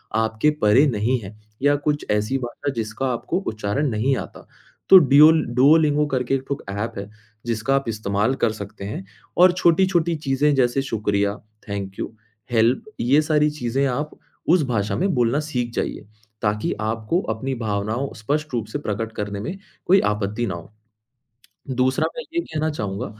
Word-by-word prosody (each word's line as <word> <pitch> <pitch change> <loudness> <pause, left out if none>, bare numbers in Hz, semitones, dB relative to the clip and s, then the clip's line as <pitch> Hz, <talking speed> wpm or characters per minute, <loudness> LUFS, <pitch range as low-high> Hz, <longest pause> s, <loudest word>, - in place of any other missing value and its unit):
आपके 110 +5 +2
परे 110 +8 +5
नहीं 120 +1 +1
है, 105 0 -10 0.3
या 145 +1 +4
कुछ 145 +1 -1
ऐसी 105 +6 +1
भाषा 130 +3 -4
जिसका 115 +4 -2
आपको 165 +9 -2
उच्चारण 110 +7 -1
नहीं 120 +4 +1
आता, - - -8 0.4
तो 190 - +11
डिओ 150 0 +7 0.2
डुओलिंगो 150 +2 +5
करके 130 +1 +1
1 135 - -2
ख़ुद 140 - -3
ऐप 105 +3 -3
है, 100 +1 -6 0.4
जिसका 115 +3 0
आप 135 -1 0
इस्तेमाल 105 +2 0
कर 115 - +4
सकते 100 -2 -8
हैं 100 -2 -5 0.3
और 180 +1 +7
छोटी-छोटी 175 -1 +2
चीज़ें 145 -1 +1
जैसे 130 +1 +2
शुक्रिया, 105 -5 0 0.3
थैंक 100 -1 -5
यू - - -4 0.4
हेल्प 120 - +3 0.2
ये 135 +6 +4
सारी 150 -1 +2
चीज़ें 135 -2 -1
आप 145 +4 -2 0.4
उस 170 0 +4
भाषा 105 -4 -1
में 195 - 0
बोलना 120 +3 +2
सीख 120 -4 -2
जाइए, - - -3 0.4
ताकि 105 0 0
आपको 115 - -1
अपनी 130 +5 -4
भावनाओं 110 +3 -2
स्पष्ट 150 +6 -2
रूप 115 -3 -1
से 110 - -4
प्रकट 110 -3 -3
करने 105 -1 -4
में 145 - -5 0.3
कोई 190 +2 +5
आपत्ति 105 +2 -1
न - - -3
हो। 85 +4 -8 1.0
दूसरा 130 +5 +2
मैं 240 - -4
ये 340 - +2
कहना 160 - -2
चाहूँगा, 105 -3 -4
125 Hz, 165 wpm, -22 LUFS, 105-145 Hz, 1.0 s, तो